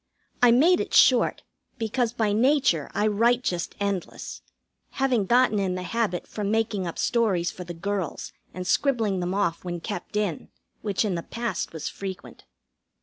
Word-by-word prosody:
I 245 - +7
made 315 +10 +5
it - - -2
short, - - +5 0.3
because 230 +1 0
by 220 -3 0
nature 245 - +2
I 210 - +2
write 230 +4 +3
just 175 -5 -2
endless, 200 -3 -4 0.5
having 250 -7 +1
gotten 240 -2 +4
in 190 -2 0
the 185 - -4
habit 190 -2 -1
from 205 -2 -4
making 215 -4 0
up 170 - -6
stories 195 -8 +1
for 180 - -9
the 175 0 -7
girls 190 -1 -3 0.2
and 185 0 -6
scribbling 225 -5 +1
them 180 +1 -2
off 185 -5 0
when 175 -1 -4
kept 205 +4 -6
in, 205 -7 -2 0.3
which 205 0 0
in 200 - 0
the 170 - -2
past 235 +5 -4
was 160 -2 -5
frequent. 190 -2 -7
205 Hz, 165 wpm, -25 LUFS, 180-235 Hz, 0.5 s, I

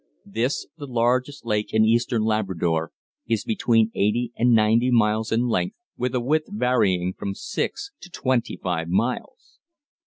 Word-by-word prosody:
This, 115 +7 -1
the 145 - -6
largest 125 +3 0
lake 105 -2 -1
in 110 0 +4
eastern 115 0 +2
Labrador, 90 -7 0 0.4
is 115 -2 0
between 115 0 +2
eighty 115 +4 0
and 120 +1 +3
ninety 115 +2 +4
miles 110 -2 +2
in 120 +2 +2
length, 90 -6 -1 0.2
with 125 +1 -2
a - - +2
width 155 +6 0
varying 105 - +1
from 100 +1 -5
six 405 - -4
to 180 - -11
twenty 130 -7 -1
five 85 -3 -2
miles. 125 - -2
115 Hz, 150 wpm, -24 LUFS, 105-125 Hz, 0.4 s, in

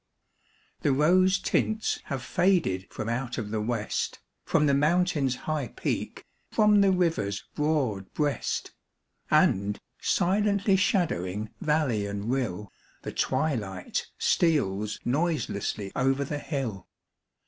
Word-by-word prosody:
The 145 - +1
rose 185 +7 +4
tints 215 +2 0
have 135 -4 -4
faded 170 - +1
from - - -5
out 125 +1 -2
of 105 -4 -4
the 110 -1 -1
West, 110 -1 -2 0.3
From 150 -2 +3
the 140 - +3
Mountain's 150 -2 +2
high 155 -5 -1
peak, - - -4 0.2
from 210 -1 +4
the 200 - +5
river's 165 - 0
broad 135 -11 0
breast. 145 -2 -1 0.6
And, 100 +2 +3 0.2
silently 200 +2 +2
shadowing 110 - 0
valley 150 - +1
and 100 +3 -3
rill, 105 -7 -2 0.3
The - - -4
twilight 120 - -1
steals 105 - +1
noiselessly 120 - -1
over 135 +1 +2
the 145 +1 -4
hill. 130 - -4
140 Hz, 115 wpm, -27 LUFS, 105-170 Hz, 0.6 s, the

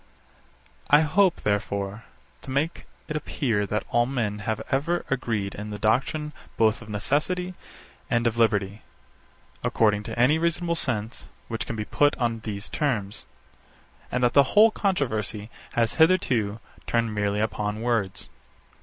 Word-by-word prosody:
I 145 +1 +7
hope, 180 +4 +3
therefore, 100 +1 -2 0.4
to - - -10
make 140 +5 -1 0.2
it 155 - -4
appear 115 -8 -1
that 105 +2 -2
all 120 0 +3
men 115 -6 -2
have 110 +1 -2
ever 165 +6 0
agreed 110 -7 -1
in 105 +1 -6
the 105 - -5
doctrine 135 +8 0 0.2
both 110 0 +3
of 110 - -11
necessity 155 - -1 0.6
and 120 0 +1
of 115 -1 +1
liberty, 105 -3 +1 0.8
according 105 -2 +2
to - - -6
any 135 +7 +4
reasonable 170 +1 0
sense, 115 -8 -3 0.2
which 115 -1 -3
can - - -3
be 105 -1 -3
put 145 +5 +2
on 115 -2 0
these 105 -2 -3
terms; 110 -10 -2 0.8
and 125 0 0
that 120 - +3
the 140 - +8 0.2
whole 220 +1 +8
controversy 115 - -1 0.2
has 115 -1 +1
hitherto 130 - +2 0.3
turned 115 -2 +1
merely 105 0 0
upon 105 0 -2
words. 115 -5 -1
115 Hz, 145 wpm, -25 LUFS, 105-145 Hz, 0.8 s, the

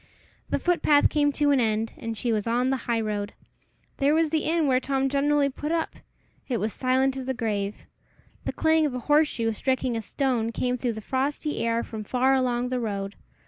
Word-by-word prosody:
The - - +1
footpath 335 -4 +3
came 290 -1 +2
to 290 0 +2
an 275 - +4
end, 220 -1 0
and 225 -1 -5
she 240 - -1
was 215 0 -1
on 245 +3 +1
the - - +2
high 230 -1 +2
road. 210 -1 -3 0.6
There 285 +2 +3
was 320 -1 +2
the 315 -1 0
inn 325 0 +2
where 255 -2 +3
Tom 270 0 0
generally 285 +1 +2
put 295 +3 -4
up! 330 -1 -1 0.5
It 250 - 0
was 215 0 -2
silent 260 +1 +1
as 260 - -5
the 265 - -1
grave. 210 -4 -3 0.6
The - - -1
clang 320 -1 +3
of 260 - -5
a - - -2
horseshoe 295 -6 +2
striking 260 +1 -1
a 225 - -2
stone 240 -1 -1
came 250 +1 0
through 245 -1 -2
the 220 - -7
frosty 280 +5 -2
air 230 0 0
from 220 -2 -6
far 255 +5 +2
along 250 -2 +1
the 255 0 -1
road. 200 -3 -3
255 Hz, 205 wpm, -26 LUFS, 230-285 Hz, 0.6 s, an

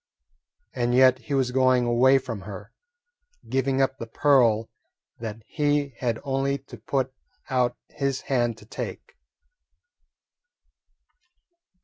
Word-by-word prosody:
And 120 0 0
yet 130 0 +6
he 140 +3 -3
was 130 -2 +1
going 130 -1 +3
away 125 +3 +5
from 115 -6 -5
her, 95 -1 -9 0.8
giving 135 0 +1
up 135 0 -1
the 115 - -6
pearl 115 -4 +3 0.5
that 115 -1 -6
he 145 -1 0
had 120 -3 0
only 135 0 0
to 130 -2 -13
put 130 +3 -1 0.4
out 125 -2 +1
his 140 -2 -2
hand 120 -4 0
to 105 - -15
take. - - -7
130 Hz, 115 wpm, -25 LUFS, 120-135 Hz, 0.8 s, yet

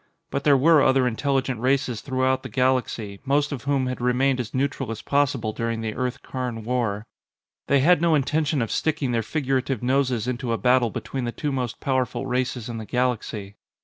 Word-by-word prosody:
But 140 - -2
there 145 -2 +6
were 155 +2 +5
other 130 -1 +4
intelligent 130 0 0
races 125 -2 0
throughout 130 -1 0
the - - -8
galaxy, 125 -6 0
most 145 +2 +1
of 135 -4 -5
whom 140 -2 +1
had 130 -1 -4
remained 130 +2 +2
as 115 -3 -4
neutral 135 -1 -1
as 115 -1 -5
possible 135 -6 +1
during 115 0 -2
the 110 -1 -3
Earth 125 +2 -3
Karn 125 -4 -4
war. 115 -3 -1 0.6
They 140 -1 +4
had 165 +2 +5
no 170 -2 +4
intention 150 -1 +1
of 115 - -4
sticking 145 -5 0
their 115 -1 +1
figurative 135 -1 -1
noses 125 -3 +1
into 125 -1 -2
a - - 0
battle 125 -1 +3
between 130 +4 -4
the 120 - -2
two 145 +4 -3
most 125 -3 -3
powerful 130 -1 -1
races 125 -2 -2
in 115 -2 -5
the 110 - -6
galaxy. 115 -5 -2
130 Hz, 190 wpm, -24 LUFS, 120-135 Hz, 0.6 s, there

